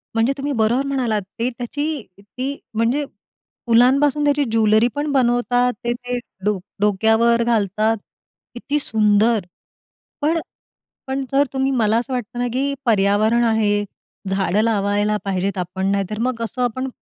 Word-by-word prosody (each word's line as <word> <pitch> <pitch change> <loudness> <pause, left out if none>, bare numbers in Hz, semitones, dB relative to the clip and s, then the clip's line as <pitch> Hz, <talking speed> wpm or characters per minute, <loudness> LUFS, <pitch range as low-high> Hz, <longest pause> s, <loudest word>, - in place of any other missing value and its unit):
म्हणजे 230 +4 +2
तुम्ही 285 +1 -3
बरोबर 240 +3 +1
म्हणालात, 245 -6 0 0.2
ते 240 +2 +1
त्याची 290 +5 -4 0.2
ती 260 +7 -5 0.2
म्हणजे 240 +6 +1 0.6
फुलांपासून 270 +5 +4
त्याची 290 0 +2
ज्वेलरी 220 +1 +4
पण 290 0 -1
बनवतात. 245 -1 +2
ते 240 0 0
ते 245 0 -4 0.3
डो 210 -2 +2 0.2
डोक्यावर 225 +3 +3
घालतात, 220 -1 +1 0.6
किती 285 +5 -2
सुंदर. 215 -3 +2 0.8
पण 320 +3 +2 0.7
पण 265 +1 -2
जर 280 +1 +3
तुम्ही 265 0 0
मला 225 -3 +2
असं 250 +3 -2
वाटतं 245 -1 -4
ना 245 - 0
की 275 +2 0
पर्यावरण 215 +2 +3
आहे, 210 -2 +2 0.5
झाडं 195 +1 +1
लावायला 205 -1 +1
पाहिजेत 195 0 -1
आपण, 185 +2 -2
नाही 200 0 +1
तर 215 0 -4
मग 245 -1 -1
असं 245 +3 -4
आपण 260 +2 -1
235 Hz, 140 wpm, -20 LUFS, 210-260 Hz, 0.8 s, फुलांपासून